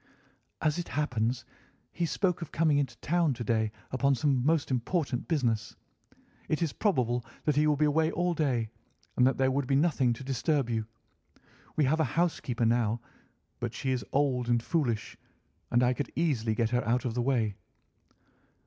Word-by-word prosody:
"As 155 +2 +1
it 175 - -4
happens, 120 -4 -1 0.5
he 170 -1 -1
spoke 180 0 0
of 165 - -6
coming 155 -3 +3
into 130 -5 -2
town 165 -4 +1
to 120 - -5
day 110 -1 +1 0.2
upon 135 +2 +2
some 130 0 +1
most 155 0 +1
important 130 +1 -1
business. 120 -9 0 0.7
It 155 +2 +1
is 160 - -1
probable 125 - +1 0.2
that 150 - +2
he 150 +1 +3
will 150 - +3
be 150 +1 +2
away 160 +2 +2
all 175 +1 0
day, 125 -9 0 0.4
and 125 - +5
that 135 - +1
there 130 0 +2
would 135 0 -1
be 135 - +2
nothing 140 -4 +3
to 120 - -8
disturb 135 0 0
you. 110 -1 -1 0.9
We 155 - +3
have 150 +4 +2
a - - +4
housekeeper 130 -9 +1
now, 115 -1 +2 0.6
but - - -4
she 130 - -1
is 130 -2 -1
old 130 -4 +1
and 120 -1 +2
foolish, 120 -10 -1 0.5
and 120 +1 +3
I 125 +1 +3
could 140 - -4
easily 125 -10 +1
get 115 0 0
her 125 0 +1
out 120 +3 0
of 120 - -1
the 120 - 0
way." 120 -5 +1
130 Hz, 180 wpm, -29 LUFS, 120-155 Hz, 0.9 s, and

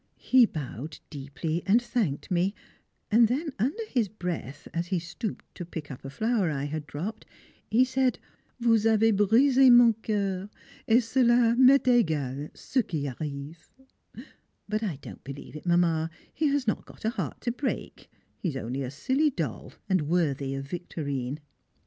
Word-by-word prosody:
He 255 -3 +5
bowed 150 - -6
deeply 150 +3 -3
and 210 +5 +6
thanked 235 - -2
me, 185 +3 +1 0.6
and 230 +2 +6
then 290 +7 -1
under 290 - -1
his 240 - +1
breath, 175 - -5
as 170 +1 -2
he 185 - 0
stooped 175 +6 -5
to - - -6
pick 160 -4 -7
up 125 - -9
a 135 - -6
flower 220 - 0
I 140 -2 -2
had 150 +1 -4
dropped, 180 +10 -5 0.5
he 245 +4 +4
said, 260 0 +1 0.4
"Vous 225 -2 +3
avez 225 0 +4
brisé 250 +6 +5
mon 240 -1 +8
coeur, 200 -3 -2 0.4
et 235 +2 +5
cela 240 -1 +3
m'est 265 +2 +6
égal 155 - +1
ce 260 - 0
qui 155 -9 -3
arrive," 145 +4 -6 1.0
but 215 +1 -1
I 200 -8 -2
don't - - -10
believe 140 +2 -9
it, 155 - -8
Mamma, 165 -2 +2 0.2
he 310 - +1
has 280 -2 +1
not 215 - -1
got - - -12
a 220 - +2
heart - - -4
to 240 - -1
break, 260 +3 -4 0.3
he 180 - -1
is 135 - -4
only 130 +2 -4
a 130 - -3
silly 260 - +1
doll 150 - -4
and 185 -6 +1
worthy 140 -6 0
of 135 0 -4
Victorine. 140 -4 -4
185 Hz, 165 wpm, -27 LUFS, 150-240 Hz, 1.0 s, mon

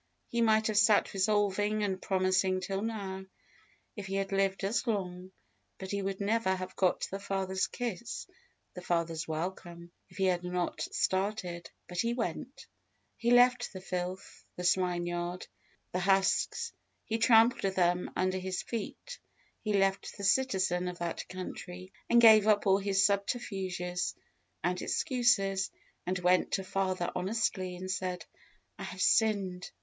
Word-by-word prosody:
He 235 - 0
might 220 -1 +4
have 215 -2 +3
sat 210 0 +4
resolving 205 +1 +1
and 190 -2 -2
promising 185 0 +1
till 195 +1 -3
now, 200 -4 -4 0.7
if 205 -2 -6
he 195 - -3
had 195 0 -1
lived 195 0 +1
as 210 +6 0
long, 185 -4 -3 0.5
and 190 0 -6
he 200 0 -1
would 195 0 -3
never 205 -1 +1
have 185 0 -6
got 185 -2 +2
the 195 - -4
father's 190 -1 -1
kiss, 235 -2 -5 0.5
the 180 - -8
father's 165 -2 -1
welcome, 170 +1 -5 0.2
if - - -16
he 190 - +2
had 180 -1 +1
not 180 -1 -2
started; 185 -3 -1 0.2
but 180 -1 -6
he 235 +3 +1
went. 240 - -4 0.5
He 235 - -1
left 245 -1 +4
the 190 - -6
filth, 185 0 -5
the 180 - -6
swine 180 -1 +2
yard, 175 +1 -3 0.5
the 180 - -1
husks 195 - +1 0.3
he 225 0 -2
trampled 225 -4 +4
them 180 0 +2
under 185 0 0
his 185 0 -3
feet; 240 - -6 0.4
he 215 - -3
left 195 0 +1
the 200 - -7
citizen 190 -5 +2
of 180 -1 -5
that 170 -1 -4
country, 185 0 -7 0.2
and 235 - +6
gave 220 -2 +8
up 210 -1 +4
all 195 0 +4
his 195 0 +2
subterfuges 195 -4 -1 0.5
and 180 +1 0
excuses, 195 -7 +1 0.4
and 185 +1 0
went 180 0 +2
to 195 - +1
his - - -15
father 185 -2 0
honestly, 185 -1 -1
and 185 +1 -5
said, 185 -1 -3 0.5
"I - - -5
have - - -8
sinned!" 195 -5 +2
190 Hz, 155 wpm, -31 LUFS, 180-210 Hz, 0.7 s, gave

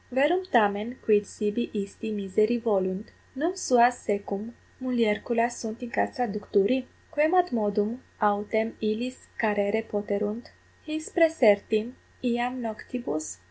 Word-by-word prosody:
Verum 295 +9 +3
tamen 215 +1 +2
quid 210 -1 +4
sibi 210 +3 -2
isti 205 +2 -4
miseri 210 +3 +1
volunt? 200 -3 -1 0.2
num 330 +7 -1
suas 245 -7 +4
secum 205 +2 -3 0.3
mulierculas 235 -1 +1
sunt 225 +1 -6
in 240 - -7
castra 250 -1 0
ducturi? 210 +4 +1 0.3
Quemadmodum 245 - +2 0.2
autem 210 +2 +1
illis 225 +4 -3
carere 210 0 +1
poterunt, 210 +1 -3 0.3
his 310 0 -5
praesertim 230 - +4 0.3
iam 245 +1 0
noctibus? 215 - -5
225 Hz, 105 wpm, -27 LUFS, 205-250 Hz, 0.3 s, quid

